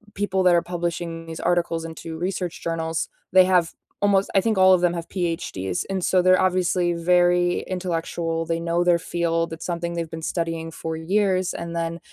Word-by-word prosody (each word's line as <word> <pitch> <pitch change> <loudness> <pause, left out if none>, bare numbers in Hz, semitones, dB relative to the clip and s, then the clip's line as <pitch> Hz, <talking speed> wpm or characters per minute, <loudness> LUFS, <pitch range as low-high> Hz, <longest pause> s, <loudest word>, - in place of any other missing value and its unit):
people 190 -2 0
that 180 -1 +5
are 170 - +4
publishing 170 -1 -4
these 165 0 -7
articles 170 -1 0
into 160 0 -7
research 180 0 -3
journals, 165 -1 -2 0.2
they 185 -1 +7
have 180 -3 +2 0.3
almost, 200 -1 +3
I 195 - +5
think 220 -1 0
all 185 0 +7
of 180 - +3
them 175 -1 +2
have 170 0 -5
PhDs, 170 - -3
and 190 -2 -2
so 185 -1 +3
they're 185 0 +5
obviously 180 -1 +1
very 175 +1 +2
intellectual, 165 -2 -3
they 165 0 -1
know 170 +1 0
their 175 -1 +3
field, 165 -1 -1
it's 165 - -7
something 170 -1 -3
they've 170 -2 -3
been 160 - -6
studying 165 0 -3
for 160 0 -5
years, 185 +1 +1
and 170 0 -6
then, 170 0 -2
170 Hz, 190 wpm, -23 LUFS, 165-185 Hz, 0.3 s, they